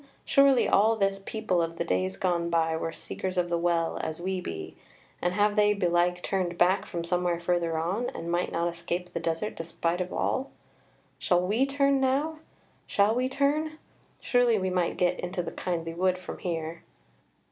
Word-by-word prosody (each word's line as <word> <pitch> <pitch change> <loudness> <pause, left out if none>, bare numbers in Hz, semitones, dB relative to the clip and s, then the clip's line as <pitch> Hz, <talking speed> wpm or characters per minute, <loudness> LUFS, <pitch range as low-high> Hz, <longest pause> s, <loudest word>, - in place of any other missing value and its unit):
Surely 275 -2 +5
all 220 +3 +4
this 195 -2 0
people 215 -5 0
of 165 0 -3
the - - 0
days 95 0 -1
gone 170 -2 0
by 165 -1 +2
were 165 0 -2
Seekers 185 +2 -5
of 175 -1 +1
the 170 - +1
Well 170 -1 0
as 160 0 -4
we 185 +1 -2
be; 80 - -6 0.5
and 175 +1 0
have 205 0 +3
they 210 -1 +4
belike 180 -1 +1
turned 180 -3 -1
back 185 +3 +3
from 170 -2 -4
somewhere 175 0 0
further 170 -1 0
on, 190 +9 -1
and 170 +1 -4
might 175 +1 0
not 170 +1 0
escape 175 +1 -4
the 170 - -2
desert 165 +5 -2
despite 165 +1 -2
of 180 - -4
all? 265 +1 -1 0.7
Shall 180 0 +2
we 225 +8 +2
turn 275 -1 +2
now: 285 +4 +1 0.5
shall 205 +2 +3
we 255 +2 0
turn? 295 +3 0 0.5
surely 245 -3 +3
we 190 -1 -1
might 180 -2 0
get 180 0 +1
into 180 0 -3
the - - -5
kindly 165 -2 -3
wood 185 +2 +1
from 185 - -8
here." 165 -1 -4
180 Hz, 180 wpm, -28 LUFS, 170-210 Hz, 0.7 s, Surely